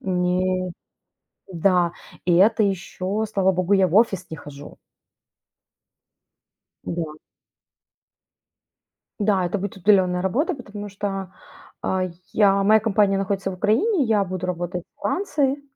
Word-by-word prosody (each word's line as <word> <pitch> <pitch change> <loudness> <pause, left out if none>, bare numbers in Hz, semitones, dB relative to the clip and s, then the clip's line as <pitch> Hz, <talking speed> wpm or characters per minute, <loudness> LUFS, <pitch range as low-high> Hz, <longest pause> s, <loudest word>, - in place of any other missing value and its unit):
Не 185 0 0 0.8
Да. 175 -1 +2 0.3
И 175 - +4
это 215 +5 +4
еще, 195 +1 -2
слава 190 -2 +3
богу, 185 +1 -1
я 190 -2 +4
в 170 - -4
офис 195 -4 +3
не 160 - -5
хожу. 145 -1 -11 2.1
Да. 165 -3 -4 2.1
Да, 200 -3 +2
это 175 +4 -1
будет 200 0 -5
удаленная 185 -2 +3
работа, 275 - 0
потому 205 -5 -8
что, 195 -1 -4 0.5
а, 185 0 0 0.3
я 200 -2 +4
моя 215 +2 +5
компания 205 -2 +2
находится 195 0 -2
в - - -6
Украине, 275 - +2
я 215 -3 +2
буду 185 -1 -4
работать 175 0 -3
во - - -30
Франции. 290 -7 0
195 Hz, 120 wpm, -23 LUFS, 180-210 Hz, 2.1 s, моя